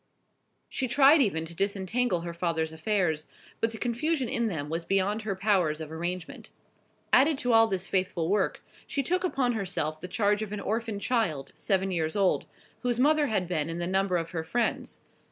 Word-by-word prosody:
She 260 Hz, -, -2 dB
tried 280 Hz, +4 st, +6 dB
even 165 Hz, -9 st, +1 dB
to 165 Hz, -, -9 dB
disentangle 195 Hz, +2 st, 0 dB
her 170 Hz, 0 st, -5 dB
father's 165 Hz, -2 st, -1 dB
affairs; 160 Hz, -3 st, 0 dB, 0.3 s
but 225 Hz, -, +1 dB
the 225 Hz, -, -8 dB
confusion 255 Hz, +4 st, -1 dB
in 235 Hz, 0 st, 0 dB
them 155 Hz, -8 st, -3 dB
was 165 Hz, +2 st, -3 dB
beyond 195 Hz, +4 st, +1 dB
her 205 Hz, -2 st, -2 dB
powers 185 Hz, -6 st, +1 dB
of 155 Hz, -1 st, -7 dB
arrangement. 175 Hz, +1 st, -5 dB, 0.6 s
Added 285 Hz, +3 st, +5 dB
to 245 Hz, -3 st, 0 dB
all 225 Hz, 0 st, +7 dB
this 190 Hz, -3 st, -2 dB
faithful 185 Hz, -3 st, 0 dB
work, 200 Hz, +1 st, 0 dB, 0.2 s
she 280 Hz, -, -1 dB
took 360 Hz, +6 st, 0 dB
upon 270 Hz, -9 st, +1 dB
herself 180 Hz, -7 st, -2 dB
the 180 Hz, -, -5 dB
charge 205 Hz, +1 st, +1 dB
of 215 Hz, -2 st, -4 dB
an 210 Hz, -, -3 dB
orphan 220 Hz, +1 st, -2 dB
child, 185 Hz, -, -1 dB
seven 195 Hz, -1 st, 0 dB
years 160 Hz, -3 st, -1 dB
old, 195 Hz, -2 st, +2 dB, 0.3 s
whose 245 Hz, -2 st, -1 dB
mother 300 Hz, +2 st, +4 dB
had 195 Hz, -6 st, 0 dB
been 165 Hz, -3 st, -1 dB
in 165 Hz, -, -3 dB
the 175 Hz, -, -2 dB
number 190 Hz, 0 st, +1 dB
of 165 Hz, -1 st, -4 dB
her 165 Hz, -3 st, -3 dB
friends. 235 Hz, +8 st, -2 dB
195 Hz, 190 wpm, -28 LUFS, 170-230 Hz, 0.6 s, all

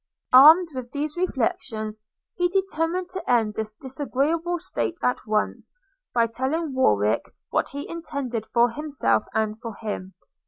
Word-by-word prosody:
Armed 315 Hz, +7 st, +9 dB
with 255 Hz, -2 st, -6 dB
these 295 Hz, +1 st, -3 dB
reflections, 225 Hz, -9 st, -2 dB, 0.3 s
he 355 Hz, 0 st, +1 dB
determined 360 Hz, -1 st, -1 dB
to 375 Hz, 0 st, -6 dB
end 225 Hz, -4 st, +3 dB
this 215 Hz, 0 st, -3 dB
disagreeable 290 Hz, +7 st, -1 dB
state 345 Hz, 0 st, -3 dB
at 250 Hz, -, +2 dB
once, 215 Hz, 0 st, -1 dB, 0.4 s
by 235 Hz, -1 st, +3 dB
telling 265 Hz, +7 st, -2 dB
Warwick 105 Hz, -, +2 dB, 0.3 s
what -, -, +1 dB
he 285 Hz, +2 st, -6 dB
intended 280 Hz, -9 st, -4 dB
for 240 Hz, 0 st, +3 dB
himself 290 Hz, -5 st, 0 dB
and 220 Hz, 0 st, 0 dB
for 230 Hz, -3 st, -6 dB
him. 195 Hz, -3 st, -6 dB
265 Hz, 140 wpm, -24 LUFS, 220-325 Hz, 0.4 s, Armed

